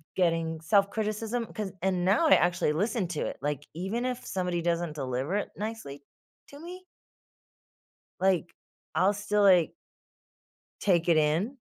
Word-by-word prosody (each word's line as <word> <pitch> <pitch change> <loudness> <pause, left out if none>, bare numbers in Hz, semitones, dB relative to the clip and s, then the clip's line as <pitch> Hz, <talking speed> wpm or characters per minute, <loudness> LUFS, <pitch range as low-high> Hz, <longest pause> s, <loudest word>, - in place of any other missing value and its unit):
getting 165 -3 0
self-criticism, 215 +5 0
'cause 205 -3 -4
and 185 -2 +1
now 210 - +4
I - - +7
actually 175 -3 +2
listen 205 +4 0
to 155 - -3
it, - - -6
like, 145 0 -3
even 195 +8 -2
if 250 -1 -3
somebody 180 -2 -2
doesn't 170 -2 0
deliver 135 +5 -2
it 205 - -1
nicely 210 -10 -6 0.5
to 285 - -12
me 365 +3 -9 1.4
like, 185 -3 +1 0.4
I'll 190 +2 +3
still, 205 0 0
like 180 -4 +5 1.1
take 175 -4 +2
it 170 - +5
in 160 - +1
185 Hz, 140 wpm, -28 LUFS, 165-215 Hz, 1.4 s, I